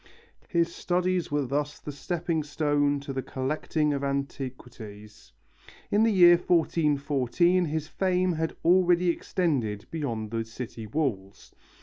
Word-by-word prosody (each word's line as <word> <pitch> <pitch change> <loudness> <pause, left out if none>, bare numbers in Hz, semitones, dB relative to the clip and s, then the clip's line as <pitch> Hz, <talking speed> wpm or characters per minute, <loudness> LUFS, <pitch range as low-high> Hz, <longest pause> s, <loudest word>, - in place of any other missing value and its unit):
His 170 -2 0
studies 180 0 0
were 145 -1 0
thus 145 +3 -2
the 150 - -7
stepping 165 +2 -2
stone 145 -1 0
to 140 -1 -6
the 130 - -2
collecting 150 +3 -1
of 140 0 -3
antiquities. 125 -6 -6 0.6
In 205 - +3
the 225 0 +4
year 175 -3 +7
1414 160 0 +1
his 155 0 -3
fame 185 0 0
had 160 0 -2
already 180 0 +4
extended 135 - -1
beyond 115 -9 -3
the 115 -1 -1
city 115 -1 -8
walls. 105 -7 -3
145 Hz, 125 wpm, -27 LUFS, 130-175 Hz, 0.6 s, year